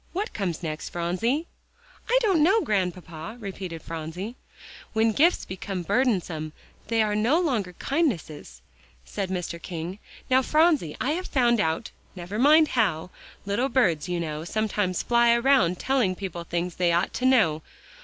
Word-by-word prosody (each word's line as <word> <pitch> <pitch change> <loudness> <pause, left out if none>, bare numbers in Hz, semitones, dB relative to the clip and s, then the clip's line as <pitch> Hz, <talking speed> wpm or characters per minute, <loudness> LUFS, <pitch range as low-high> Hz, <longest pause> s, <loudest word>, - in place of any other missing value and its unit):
Now - - -36
what 425 - -5
comes 180 -5 -3
next, 155 -1 -4
Phronsie?" 185 - -1 0.6
"I - - +4
don't 380 -8 +3
know, 390 +8 +4
Grandpapa," 180 - -3
repeated 190 -6 -6
Phronsie. 165 +7 -6 0.6
"When 225 0 +3
gifts 330 - +3
become 185 0 -5
burdensome 180 - 0 0.3
they 225 0 +2
no 230 +10 +2
longer 245 - 0
are - - -13
kindnesses," 170 - -2 0.4
said 195 - -4
Mr. 180 -2 -4
King. 175 +3 -6 0.3
"Now, 260 0 +4
Phronsie, 305 - +2
I 270 - 0
have 360 +4 -3
found 240 -3 +2
out 160 +2 -1 0.2
never 185 +4 -5
mind 305 +4 +6
how; 180 -8 0 0.3
little 205 +7 0
birds, 185 - +1
you 175 -1 -1
now, 155 -2 -4
sometimes 205 -1 -1
fly 235 0 +4
around 235 -8 +3
telling 245 -8 +1
people 175 -3 -6
things 175 +1 -3
they 175 -1 +2
ought 175 +2 +1
to 250 - -2
know. 180 -12 +3
200 Hz, 155 wpm, -25 LUFS, 170-255 Hz, 0.6 s, mind